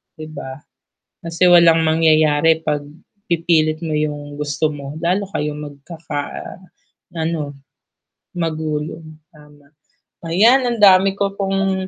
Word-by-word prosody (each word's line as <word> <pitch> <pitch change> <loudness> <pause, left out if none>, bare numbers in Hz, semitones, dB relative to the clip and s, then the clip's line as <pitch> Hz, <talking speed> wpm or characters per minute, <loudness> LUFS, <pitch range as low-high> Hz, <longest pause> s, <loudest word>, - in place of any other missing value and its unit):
'di 155 0 -9
ba? 130 - -6 0.7
Kasi 165 +2 -2
walang 165 -1 +6
mangyayari 155 -1 +3
'pag 145 -1 0 0.5
pipilit 160 -2 +1
mo - - -3
'yong 145 -1 -6
gusto 145 +1 -2
mo. 140 - -9 0.2
Lalo 185 +4 +1
kayong 150 0 -2
magkaka-ano, 160 +2 -7 1.0
magulo, 155 0 -4 0.3
tama. 150 -1 -19 0.6
Ayan 235 +10 +4
ang 235 -2 -2
dami 195 0 +6
ko 200 0 -1
pong 195 -1 -1
160 Hz, 105 wpm, -19 LUFS, 150-185 Hz, 1.0 s, walang